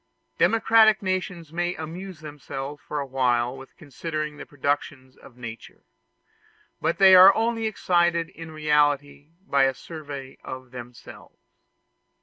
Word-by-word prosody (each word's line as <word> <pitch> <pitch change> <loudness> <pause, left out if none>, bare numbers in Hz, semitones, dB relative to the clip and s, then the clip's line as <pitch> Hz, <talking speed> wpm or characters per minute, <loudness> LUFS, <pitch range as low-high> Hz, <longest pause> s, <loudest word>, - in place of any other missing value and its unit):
Democratic 225 -2 +4
nations 180 -4 -3
may 175 +1 -1
amuse 170 +2 -8
themselves 145 -1 -7
for 150 - -5
a 140 - -3
while 125 -2 0
with 135 0 -13
considering 155 +1 -5
the - - -10
productions 140 -2 -3
of 125 - -17
nature; 115 -2 -10 1.0
but 170 - 0
they 195 -1 +7
are 185 +1 +9
only 225 0 0
excited 175 -5 +1
in 165 -3 -10
reality 145 -2 0 0.2
by 140 -5 +3
a 135 -1 0
survey 140 -3 -9
of 130 -1 -8
themselves. 120 -1 -12
150 Hz, 130 wpm, -24 LUFS, 135-175 Hz, 1.0 s, are